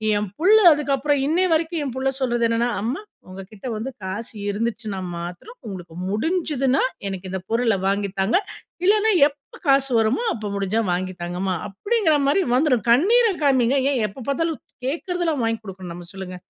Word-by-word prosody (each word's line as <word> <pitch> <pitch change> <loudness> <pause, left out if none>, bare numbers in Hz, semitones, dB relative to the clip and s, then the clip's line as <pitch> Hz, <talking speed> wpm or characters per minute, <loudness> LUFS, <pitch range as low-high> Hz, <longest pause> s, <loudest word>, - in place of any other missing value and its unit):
என் 205 -1 -1
புள்ள 390 +6 +5 0.2
அதுக்கப்புறம், 285 0 0
இன்னய 350 +5 +2
வரைக்கும் 320 0 0
என் 255 - -4
புள்ள 270 0 +1
சொல்றது 240 -2 +1
என்னன்னா 235 +1 +1
"அம்மா, 245 - -2 0.3
உங்க 185 +1 -8
கிட்ட 215 +4 -9
வந்து 220 +5 -4
காசு 205 +6 -5 0.2
இருந்துச்சுன்னா 215 -1 -3 0.2
மாத்திரம், 180 - -8
உங்களுக்கு 180 -6 -8 0.2
முடிஞ்சுதுனா 275 - +1 0.3
எனக்கு 190 -1 -5
இந்த 190 - -2
பொருள 230 -2 +2
வாங்கி 200 0 0
தாங்க. 195 - +3 0.5
இல்லனா 425 +2 +4 0.2
எப்ப 285 -1 -14
காசு 275 -1 +4
வருமோ 225 - +1
அப்போ 215 -2 -5
முடிஞ்சா 200 +3 0
வாங்கி 185 +1 -2
தாங்கம்மா" 180 +2 -2
அப்படிங்கற 350 - +1
மாரி 295 +8 +3
வந்துரும். 255 -5 +2
கண்ணீர 440 - +5 0.2
காமிங்க. 260 -1 +3
ஏன் 260 -4 0
எப்ப 230 +5 -10
பார்த்தாலும் 280 +4 +1 0.2
து - - -65 0.2
கேட்கிறதெல்லாம் 340 0 -1
வாங்கி 225 0 0
கொடுக்கணும் 190 -3 -8
நம்ம 175 0 -9
சொல்லுங்க. 190 -1 -7
240 Hz, 165 wpm, -22 LUFS, 195-300 Hz, 0.5 s, புள்ள